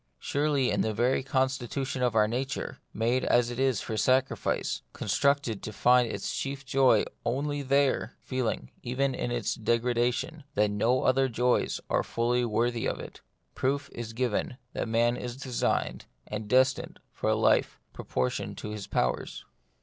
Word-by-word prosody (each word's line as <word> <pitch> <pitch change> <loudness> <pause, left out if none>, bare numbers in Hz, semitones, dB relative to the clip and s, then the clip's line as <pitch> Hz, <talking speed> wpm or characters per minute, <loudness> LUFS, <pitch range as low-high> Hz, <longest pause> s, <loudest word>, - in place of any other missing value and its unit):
Surely 140 - +1
in - - +1
the 110 -1 -1
very 125 +5 +2
constitution 130 -1 -1
of 120 -3 +1
our 105 -1 +5
nature, 130 +5 -3
made 120 +4 +1
as 120 0 +3
it 120 - -5
is 130 -5 +2
for 110 - -4
sacrifice, 130 +4 +1
constructed 140 -7 +1
to 110 - -5
find 125 +3 +4
its 100 - -3
chief 140 0 -4
joy 130 -4 +4 0.2
only 145 +5 -1
there, 140 0 +1
feeling, 120 - -3
even 135 +2 0
in 120 - -2
its 120 -2 -1
degradation, 120 +6 0
that 105 0 +3
no 115 +5 +2
other 130 +1 +3
joys 125 +1 +1
are - - +2
fully 120 +1 0
worthy 115 +1 0
of - - -2
it, - - -9 0.3
proof 140 +2 -1
is 115 -1 -6
given 125 +1 -1 0.2
that - - -2
man 115 +2 +2
is 125 0 -5
designed 130 -3 -1 0.2
and 105 0 -5
destined 130 +2 +2 0.2
for - - -1
a - - +3
life - - +2
proportioned 65 0 -2
to 105 - -6
his 105 -1 -6
powers. 60 0 -1
125 Hz, 155 wpm, -28 LUFS, 115-135 Hz, 0.3 s, our